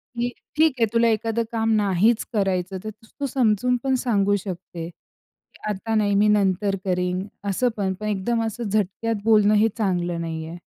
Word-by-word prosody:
की 240 Hz, +1 st, 0 dB, 0.3 s
ठीक 315 Hz, +1 st, +5 dB
आहे, 230 Hz, -, +5 dB
तुला 230 Hz, 0 st, +4 dB
एखादं 225 Hz, +1 st, 0 dB
काम 225 Hz, -1 st, 0 dB
नाहीच 210 Hz, +2 st, +2 dB
करायचं, 190 Hz, -2 st, 0 dB
तर 215 Hz, -, -4 dB
तू 225 Hz, +6 st, -8 dB
समजून 250 Hz, -1 st, +2 dB
पण 265 Hz, -1 st, +2 dB
सांगू 205 Hz, -5 st, +2 dB
शकते, 180 Hz, -3 st, -6 dB
की 175 Hz, -, -26 dB
आता 210 Hz, +2 st, -2 dB
नाही, 205 Hz, -2 st, +2 dB
मी 205 Hz, +1 st, +4 dB
नंतर 200 Hz, -1 st, +2 dB
करीन, 180 Hz, 0 st, -1 dB, 0.2 s
असं 245 Hz, +6 st, +1 dB
पण, 190 Hz, -2 st, 0 dB
पण 215 Hz, +3 st, -6 dB
एकदम 220 Hz, +3 st, 0 dB
असं 225 Hz, +2 st, -4 dB
झटक्यात 215 Hz, +2 st, 0 dB
बोलणं 210 Hz, -1 st, +5 dB
हे 215 Hz, +2 st, +5 dB
चांगलं 175 Hz, -5 st, -1 dB
नाहीये." 165 Hz, 0 st, -5 dB
210 Hz, 170 wpm, -23 LUFS, 190-225 Hz, 0.3 s, ठीक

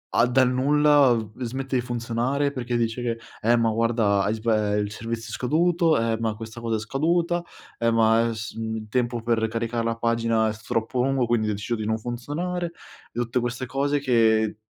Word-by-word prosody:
a 115 Hz, -, +5 dB
dal 130 Hz, 0 st, +3 dB
nulla, 145 Hz, +1 st, +4 dB
uhm, 110 Hz, -3 st, -1 dB
smette 130 Hz, +3 st, -3 dB
di -, -, +1 dB
funzionare 120 Hz, +4 st, -1 dB
perché 125 Hz, -3 st, -3 dB
dice 115 Hz, +1 st, -1 dB
che: 115 Hz, -1 st, -2 dB, 0.2 s
"Eh, 120 Hz, +2 st, +4 dB
ma 115 Hz, -1 st, +2 dB
guarda 110 Hz, -3 st, +2 dB
hai 105 Hz, +3 st, 0 dB
sba 110 Hz, -2 st, 0 dB
ehm, 105 Hz, 0 st, +1 dB
il 100 Hz, -, -7 dB
servizio 115 Hz, +1 st, -5 dB
scaduto. 165 Hz, +6 st, +2 dB
Eh, 115 Hz, 0 st, 0 dB
ma 110 Hz, -2 st, -1 dB
questa 110 Hz, +1 st, -8 dB
cosa 115 Hz, -1 st, -1 dB
è -, -, -4 dB
scaduta. 170 Hz, -, 0 dB, 0.4 s
Eh, 115 Hz, 0 st, +1 dB
ma 115 Hz, 0 st, +4 dB
è 115 Hz, -, -2 dB
s 110 Hz, +1 st, -6 dB
mhmm, 110 Hz, 0 st, -3 dB
il 110 Hz, 0 st, -7 dB
tempo 120 Hz, 0 st, -1 dB
per 115 Hz, -1 st, +1 dB
caricare 115 Hz, +1 st, -2 dB
la 115 Hz, 0 st, 0 dB
pagina 115 Hz, -1 st, +1 dB
è -, -, -3 dB
s 110 Hz, -, -14 dB
troppo 115 Hz, +2 st, -1 dB
lungo, 135 Hz, -2 st, +1 dB
quindi 115 Hz, -2 st, +1 dB
ho -, -, 0 dB
deciso 105 Hz, +4 st, -3 dB
di 110 Hz, -1 st, -4 dB
non 110 Hz, +1 st, 0 dB
funzionare", 150 Hz, +10 st, -4 dB, 0.4 s
e -, -, -4 dB
tutte 120 Hz, +1 st, 0 dB
queste 120 Hz, +1 st, -3 dB
cose 140 Hz, +2 st, 0 dB
che 110 Hz, -5 st, +2 dB
115 Hz, 210 wpm, -24 LUFS, 110-130 Hz, 0.4 s, a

